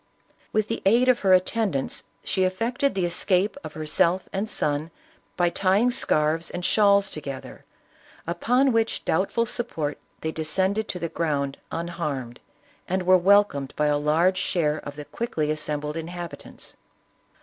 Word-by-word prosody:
With 215 -1 +1
the 230 - -3
aid 235 +6 +4
of 250 - +4
her 195 - +2
atten 200 +4 +3
dants 135 -1 -2 0.2
she 190 - 0
effected 240 +9 0
the 185 -2 +1
escape 185 +3 +1
of - - -7
herself 170 +4 +1
and 200 +3 -2
son 150 +2 -1 0.5
by 175 -1 +2
tying 200 +7 +2
scarfs 155 -7 +1
and 175 0 -5
shawls 200 -2 +4
together, 140 -3 -8 0.6
upon 250 +10 +2
which 225 -1 0
doubt 185 +4 +1
ful 230 0 +1
support 190 -11 -3 0.2
they 160 - -2
descended 190 +7 0
to - - -4
the 170 - -3
ground 145 -4 -2
unharmed, 155 -8 -4 0.5
and 185 +1 -1
were 185 +1 +6
welcomed 185 -7 +3
by 150 - +2
a 145 0 +3
large 165 +5 +2
share 155 -3 0
of 145 - -8
the 150 0 -8
quickly 155 -10 -2
assembled 150 -1 -3
inhabitants. 170 +1 -8
175 Hz, 150 wpm, -25 LUFS, 155-200 Hz, 0.6 s, were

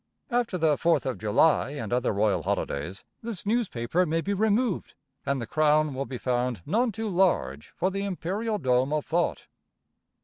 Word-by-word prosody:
After 240 -6 0
the 155 -4 +2
Fourth 165 -4 +2
of 130 -2 -2
July 135 +7 +3
and 115 -7 -4
other 125 +1 +1
royal 100 -3 +1
holidays, 80 +4 -3 0.2
this 225 -6 -5
newspaper 180 - +1
may 165 -1 0
be 200 +4 -1
removed, 215 +1 0 0.3
and 140 -1 +1
the 115 - -3
crown 155 +3 +2
will 135 +1 -3
be 130 - -5
found 125 -5 -1
none 235 +3 +1
too 220 +2 -4
large 175 - +1
for 185 +2 0
the 195 +1 -2
imperial 200 +3 -2
dome 130 -3 +1
of 150 -1 -1
thought. 170 +1 0
155 Hz, 170 wpm, -27 LUFS, 125-195 Hz, 0.3 s, July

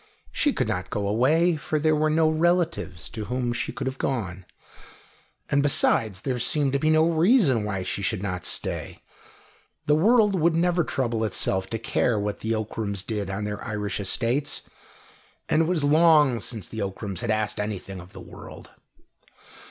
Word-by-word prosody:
She 295 - +2
could - - -1
not 90 0 -3
go 100 -1 -2
away, 155 - +3
for 155 +1 -2
there 155 +1 +2
were 155 +1 +1
no 160 +1 +3
relatives 160 - 0
to 110 -1 -6
whom 125 +2 -2
she - - -2
could - - -5
have 130 0 -4
gone, 95 -9 -3 1.0
and, 140 - +2
besides, 110 -8 +2
there 125 -1 -2
seemed 140 +2 +1
to 140 - +1
be 155 - +1
no 155 +1 +4
reason 165 - +3
why 95 -3 -3
she 100 - -3
should 100 0 -1
not 90 -3 -3
stay. - - -2 0.8
The 150 - +3
world 210 +6 +4
would 170 -2 +2
never 175 +1 +2
trouble 120 -6 -1
itself 95 -2 0
to 115 - -2
care 115 0 0
what 105 0 -3
the 110 +1 -1
Ockrams 105 -2 -3
did 105 -4 -3
on 95 +2 -3
their 105 0 -4
Irish 105 -2 -3
estates, 125 +8 0 0.8
and 155 - +2
it - - +2
was 165 -3 +1
long 150 -4 +5
since 110 -5 -5
the 110 - -6
Ockrams 100 0 -4
had 120 - -3
asked 110 -1 0
anything 100 -2 -4
of 90 +1 -14
the - - -10
world. - - -12
120 Hz, 175 wpm, -25 LUFS, 105-155 Hz, 1.0 s, long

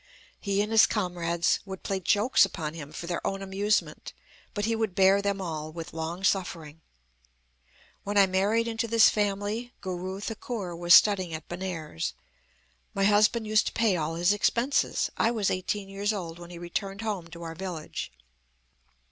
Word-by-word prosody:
"He 200 0 0
and 210 - -5
his 225 -1 +7
comrades 170 -4 0
would 190 -1 -8
play 195 -1 -2
jokes 205 +7 +3
upon 165 -5 -2
him 150 -3 -8
for 165 - -7
their 175 0 -3
own 195 0 -3
amusement; 200 +2 -1 0.4
but 205 -1 -1
he 225 0 +1
would 220 -5 -2
bear 195 +1 +5
them 200 -1 -1
all 155 -4 -4
with 165 +1 -8
longsuffering. 165 -1 -2 1.2
"When 205 +1 -2
I 200 - +8
married 200 +5 +1
into 230 0 -2
this 230 0 +6
family, 210 +3 -2
Guru 185 +1 -5
Thakur 210 -4 -5
was 175 0 +6
studying 185 -6 +4
at 155 - -9
Benares. 175 - -4 0.8
My 195 - +1
husband 210 +3 +4
used 215 0 +2
to - - -3
pay 225 -4 +2
all 160 -1 -2
his 175 +4 +3
expenses. 235 +6 +1
I 225 - +3
was 220 -4 0
eighteen 195 +2 -2
years 200 +2 -1
old 175 -5 -5
when 175 0 -10
he 175 - -9
returned 195 +4 -4
home 205 -6 -3
to 170 +1 -10
our 165 -1 -5
village. 170 - -6
195 Hz, 165 wpm, -27 LUFS, 170-210 Hz, 1.2 s, I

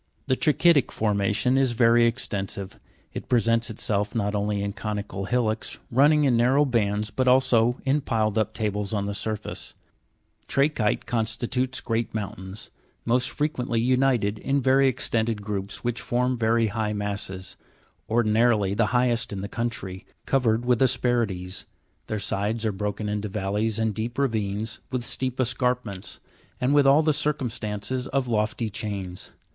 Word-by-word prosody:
The 130 - +2
Tra'chytic 150 -1 +3
formation 105 +4 +1
is 130 -3 +2
very 115 0 +5
extensive. 100 -5 -3 0.3
It - - -7
presents 115 -1 +2
itself 105 -1 -1
not 105 -2 0
only 105 0 -1
in 100 0 -3
conical 105 -2 -4
hillocks, 115 -1 -1
running 145 +5 +5
in 130 -4 +3
narrow 130 +5 +4
bands, 105 -4 0
but 130 -1 0
also 125 -2 +4
in 140 +2 +2
pi 115 -5 0
led 110 -1 0
up 110 -1 0
tables 105 -2 -2
on 100 -1 -1
the 100 - -3
surface; 110 +1 -4 0.7
tra'chyte 140 -7 +1
constitutes 120 +2 -1
great 115 -1 -2
mountains, 100 -1 -6 0.3
most 125 +1 +2
frequently 130 -6 -1
united 125 -4 +2
in 140 +1 0
very 135 +1 +4
extended 115 -4 0
groups, 100 -1 -4
which 120 -1 -2
form 125 +1 0
very 115 -1 +2
high 110 -1 -2
masses, 100 -2 -4 0.5
ordinarily 110 -3 +3
the 105 +1 +2
highest 120 -2 +1
in 100 -2 -4
the 100 - -4
country, 100 -5 -4 0.2
covered 120 -3 +1
with 125 -1 +2
asperities; 110 -8 0 0.4
their 110 - -2
sides 105 +3 -1
are 110 - +2
broken 105 +2 -3
into 105 0 -2
valleys 105 +2 -1
and 110 -1 0
deep 115 +3 -4
ravines, 110 -4 -1
with 125 -2 -3
steep 130 0 -2
escarpments, 125 -5 -1 0.4
and 130 +2 +1
with 145 -1 +5
all 145 +3 +6
the 155 0 +3
circum 145 -5 0
stances 115 +3 -3
of 135 -2 -1
lofty 110 0 0
chains. 100 -4 -5
115 Hz, 150 wpm, -25 LUFS, 105-125 Hz, 0.7 s, all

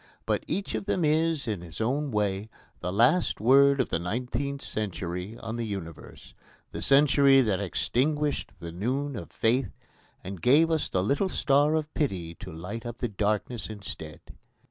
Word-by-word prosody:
But - - 0
each 200 - -2
of - - -3
them 180 -5 +1
is, 155 -2 +1
in 105 -5 -2
his 85 -1 -10
own 140 +6 0
way, 105 -2 -1 0.3
the 90 - -3
last 120 - +3
word 140 +5 +5
of 130 - +1
the - - 0
nineteenth 125 +8 -3
century 95 0 -4
on 115 0 -5
the 120 - -2
universe 95 -7 -7 0.4
the - - -6
century 140 -1 +5
that 105 -6 +1
extinguished 145 - 0
the 85 0 -7
noon 130 +10 -2
of 105 - -7
faith 120 -1 0 0.5
and 95 -2 -7
gave 155 +6 +5
us 160 -2 0
the 90 - 0
little 145 - +1
star 145 -1 +3
of 155 -1 -2
pity 90 - -2
to - - -8
light 90 +8 -6
up 120 -1 -6
the 120 - -2
darkness 105 +2 -2
instead. 100 -7 -8
120 Hz, 165 wpm, -27 LUFS, 100-140 Hz, 0.5 s, word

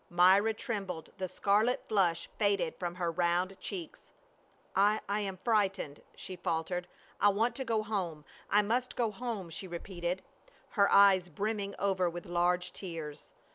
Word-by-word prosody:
Myra 190 +5 +5
trembled, 195 -8 -4
the 185 - -1
scarlet 215 +7 +1
flush 175 -5 +2
faded 200 -6 +1
from 175 -1 -3
her 175 -2 -1
round 175 +2 +1
cheeks. 180 -5 -7 0.6
"I 205 +2 +4
— - - -32
I 205 +1 0
am 195 -2 -3
frightened," 195 -8 0
she 185 - -7
faltered. 175 +1 -2 0.2
" - - -26
I 205 - +7
want 220 +4 +1
to 265 - -2
go 225 -3 0
home. 180 -8 -3 0.2
I 210 +1 +4
must 245 +4 -1
go 230 -3 +1
home," 210 -5 -5
she 190 +4 -5
repeated, 175 +1 -4 0.5
her 200 -2 +3
eyes 195 -3 +6
brimming 200 +4 -2
over 190 -3 +1
with 175 0 -7
large 175 +1 +1
tears. 165 -6 -7
190 Hz, 160 wpm, -32 LUFS, 175-205 Hz, 0.6 s, I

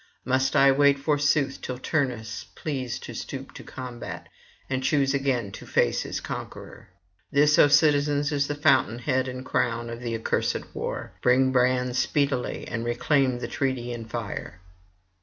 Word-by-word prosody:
Must 130 +1 +1
I 135 0 +6
wait 140 +1 +4
forsooth 145 -1 +1
till 125 - -4
Turnus 125 -6 -2
please 130 -6 -3
to - - -8
stoop - - -7
to - - -9
combat, 125 -2 -8 0.4
and 130 -1 -1
choose 135 0 +2
again 130 -7 0
to - - -10
face - - +2
his - - -4
conqueror? - - -8 0.4
This, 150 +1 +4
O - - +8
citizens, 145 -1 +3
is 140 -1 +1
the 145 - -2
fountain 130 -5 +3
head 130 +1 0
and 130 0 -6
crown 120 -1 -1
of 115 - -6
the 120 -2 -3
accursed 115 - -2
war. - - -4
Bring 130 +1 +4
brands 125 0 +2
speedily, 140 -4 0
and 115 0 -3
reclaim 130 +2 +1
the 120 - -4
treaty 130 -3 -2
in 115 -1 -6
fire.' 110 -5 -6
130 Hz, 160 wpm, -26 LUFS, 120-140 Hz, 0.4 s, O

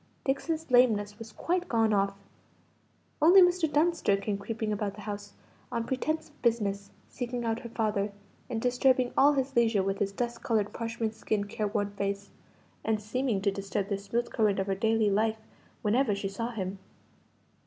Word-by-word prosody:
Dixon's 310 +2 -1
lameness 215 -4 +4
was 225 -1 -9
quite 360 +6 -1
gone 225 -2 +3
off. 195 0 +1 1.1
Only 350 +6 +8
Mr. 355 -3 +4
Dunster 300 - +2
came 200 +1 -2
creeping 220 +1 -3
about 205 -1 -2
the 210 - -10
house, 205 0 -6 0.4
on 235 -2 -1
pretence 310 +6 -2
of 295 - -27
business, 200 -4 0 0.2
seeking 245 -1 -4
out 225 0 0
her 235 - -8
father, 210 -3 -1 0.4
and 235 -2 -2
disturbing 250 +1 +2
all 290 +2 +6
his 270 -1 -1
leisure 225 -4 +3
with 195 +1 -1
his 200 -1 0
dust 240 +3 -3
coloured 215 -3 0
parchment 230 -1 -3
skinned 210 -2 -2
careworn 205 -1 -1
face, 200 0 -3 0.5
and 220 -1 +1
seeming 220 0 -1
to 200 - +3
disturb 195 0 -3
the 200 - 0
smooth 235 +4 -2
current 210 -3 +2
of 195 - 0
her 195 - 0
daily 220 +1 +2
life 220 +2 +2 0.5
whenever 220 0 +2
she 200 0 -3
saw 230 +4 -3
him. 195 -4 -4
220 Hz, 170 wpm, -29 LUFS, 200-245 Hz, 1.1 s, Only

